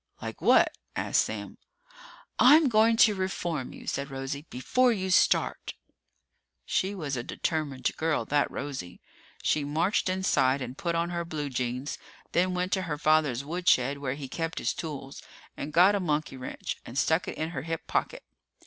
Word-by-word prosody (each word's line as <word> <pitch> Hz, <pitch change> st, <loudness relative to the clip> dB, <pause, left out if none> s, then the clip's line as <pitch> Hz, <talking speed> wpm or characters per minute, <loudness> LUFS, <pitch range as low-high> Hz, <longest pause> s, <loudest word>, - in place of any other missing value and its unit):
"Like -, -, -7 dB
what?" -, -, +5 dB, 0.2 s
asked -, -, +2 dB
Sam. -, -, -6 dB, 0.8 s
"I'm 295 Hz, +2 st, +7 dB
going 225 Hz, 0 st, +4 dB
to 220 Hz, -2 st, +6 dB
reform 175 Hz, -7 st, -3 dB
you," -, -, -11 dB
said 140 Hz, +1 st, -3 dB
Rosie, 135 Hz, +3 st, -5 dB
"before 250 Hz, -, +2 dB
you 190 Hz, -4 st, -2 dB
start!" -, -, +2 dB, 0.9 s
She 195 Hz, +2 st, 0 dB
was 150 Hz, -7 st, -3 dB
a 120 Hz, -, -2 dB
determined 140 Hz, -1 st, -2 dB
girl, 160 Hz, -1 st, 0 dB
that 145 Hz, 0 st, +1 dB
Rosie. 130 Hz, -11 st, -6 dB, 0.4 s
She 150 Hz, -, +1 dB
marched 165 Hz, +7 st, +1 dB
inside 140 Hz, -8 st, +2 dB
and 125 Hz, -1 st, -6 dB
put 170 Hz, +3 st, -2 dB
on 170 Hz, +1 st, 0 dB
her 170 Hz, -1 st, -2 dB
blue 155 Hz, -4 st, -4 dB
jeans, 125 Hz, +2 st, -3 dB, 0.3 s
then 180 Hz, +1 st, +1 dB
went 180 Hz, +1 st, -1 dB
to 190 Hz, -, +1 dB
her 150 Hz, -, -1 dB
father's 150 Hz, -4 st, +2 dB
woodshed 145 Hz, -5 st, +2 dB
where 135 Hz, -2 st, -2 dB
he 140 Hz, -2 st, -7 dB
kept 165 Hz, +4 st, -4 dB
his -, -, 0 dB
tools 140 Hz, -4 st, -7 dB, 0.3 s
and 145 Hz, -, -5 dB
got 180 Hz, +6 st, +6 dB
a 205 Hz, -, +1 dB
monkey 155 Hz, -5 st, -1 dB
wrench 130 Hz, -1 st, -5 dB
and 120 Hz, -, -8 dB
stuck 160 Hz, +4 st, +2 dB
it -, -, -5 dB
in 160 Hz, +1 st, -2 dB
her 130 Hz, -, -4 dB
hip 165 Hz, +2 st, -4 dB
pocket. -, -, -2 dB
155 Hz, 170 wpm, -28 LUFS, 140-180 Hz, 0.9 s, I'm